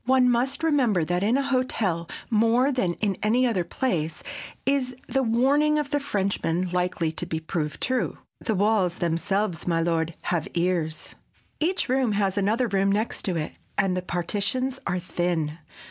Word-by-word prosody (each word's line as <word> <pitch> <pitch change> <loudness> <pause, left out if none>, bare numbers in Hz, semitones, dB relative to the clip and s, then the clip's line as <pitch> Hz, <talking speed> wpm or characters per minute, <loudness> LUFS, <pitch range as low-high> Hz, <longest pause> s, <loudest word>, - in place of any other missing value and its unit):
One 255 -1 +4
must 265 +5 0
remember 250 - +3
that 175 +2 0
in 220 +6 +3
a 275 - +1
hotel 225 -11 0 0.2
more 230 +5 +4
than 190 -10 0
in 200 -3 -1
any 235 +5 +3
other 215 -8 +1
place 170 -7 -2 0.4
is 265 -2 +1
the 270 - +1
warning 275 +6 +3
of 295 -1 -2
the 290 - +2
Frenchman 190 -8 -1
likely 180 -2 0
to 160 - -3
be 160 - -2
proved 155 -2 -3
true,—"The 250 -3 -2
walls 195 -3 +2
themselves, 175 +1 -1
my 165 -1 +2
lord, 165 -1 0
have 170 -3 -1
ears!" 170 -3 -1 0.5
Each 350 +4 +1
room 255 -3 +2
has 200 -2 +1
another 215 +5 +2
room 195 -1 +2
next 215 +3 -1
to 185 - 0
it, 155 -2 -2 0.3
and 185 -2 +2
the 185 - -1
partitions 205 +9 -1
are 180 -1 0
thin. 170 -3 -1
200 Hz, 160 wpm, -25 LUFS, 175-255 Hz, 0.5 s, One